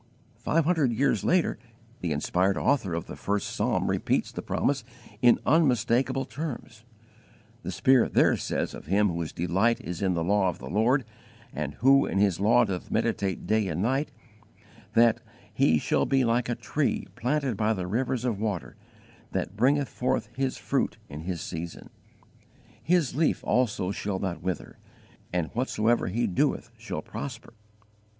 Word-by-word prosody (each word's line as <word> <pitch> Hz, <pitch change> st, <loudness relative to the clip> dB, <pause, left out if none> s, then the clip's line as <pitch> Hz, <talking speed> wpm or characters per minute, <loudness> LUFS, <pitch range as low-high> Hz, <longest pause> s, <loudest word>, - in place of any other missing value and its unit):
Five 165 Hz, -1 st, +1 dB
hundred 160 Hz, -7 st, +2 dB
years 135 Hz, +5 st, +1 dB
later 180 Hz, -10 st, +2 dB, 0.4 s
the 85 Hz, -, -2 dB
inspired 90 Hz, +6 st, +1 dB
author 100 Hz, -12 st, +1 dB
of 85 Hz, -, -3 dB
the -, -, -8 dB
first 100 Hz, 0 st, -2 dB
Psalm -, -, 0 dB
repeats -, -, 0 dB
the -, -, -5 dB
promise 140 Hz, 0 st, 0 dB, 0.4 s
in 120 Hz, -1 st, +6 dB
unmistakable 135 Hz, -3 st, +2 dB
terms. 125 Hz, -6 st, -6 dB, 0.8 s
The -, -, -5 dB
Spirit 130 Hz, -2 st, +3 dB
there -, -, +5 dB
says -, -, -2 dB
of -, -, -10 dB
him 100 Hz, +3 st, +3 dB
whose 85 Hz, -2 st, -3 dB
delight 95 Hz, +7 st, +1 dB
is 85 Hz, -1 st, -6 dB
in 95 Hz, -2 st, +1 dB
the 85 Hz, -, 0 dB
law 95 Hz, +1 st, +2 dB
of 85 Hz, -, -5 dB
the -, -, -8 dB
Lord 120 Hz, +6 st, +2 dB, 0.5 s
and 75 Hz, -2 st, -4 dB
who 135 Hz, -, +4 dB
in -, -, -2 dB
His 100 Hz, -3 st, +2 dB
law 115 Hz, +4 st, +4 dB
doth 95 Hz, -4 st, -4 dB
meditate 95 Hz, -2 st, -1 dB
day 105 Hz, +1 st, +1 dB
and 85 Hz, +2 st, -2 dB
night, 135 Hz, +6 st, 0 dB, 0.9 s
that 115 Hz, -1 st, +5 dB, 0.3 s
"he 80 Hz, -, +3 dB
shall -, -, +1 dB
be 135 Hz, -2 st, +3 dB
like 115 Hz, +1 st, +1 dB
a 120 Hz, -, 0 dB
tree -, -, -1 dB
planted 135 Hz, 0 st, 0 dB
by 110 Hz, +2 st, +1 dB
the 95 Hz, -4 st, -3 dB
rivers 120 Hz, +5 st, -1 dB
of 115 Hz, -5 st, -1 dB
water, 105 Hz, -5 st, -3 dB, 0.6 s
that 95 Hz, -, -2 dB
bringeth 135 Hz, +5 st, +2 dB
forth 125 Hz, -, -1 dB
his 135 Hz, 0 st, -1 dB
fruit -, -, -1 dB
in 75 Hz, +3 st, -8 dB
his 90 Hz, -2 st, -3 dB
season; 85 Hz, -1 st, -7 dB, 0.9 s
his 170 Hz, -5 st, +2 dB
leaf 155 Hz, +3 st, +1 dB
also 105 Hz, -7 st, +1 dB
shall 100 Hz, -1 st, -3 dB
not 95 Hz, -2 st, -3 dB
wither; 90 Hz, +1 st, -4 dB, 0.5 s
and 90 Hz, -3 st, -2 dB
_whatsoever 120 Hz, -3 st, +1 dB
he 115 Hz, +6 st, 0 dB
doeth 90 Hz, -, 0 dB
shall -, -, -6 dB
prosper." 120 Hz, -4 st, -7 dB
110 Hz, 160 wpm, -27 LUFS, 95-130 Hz, 0.9 s, in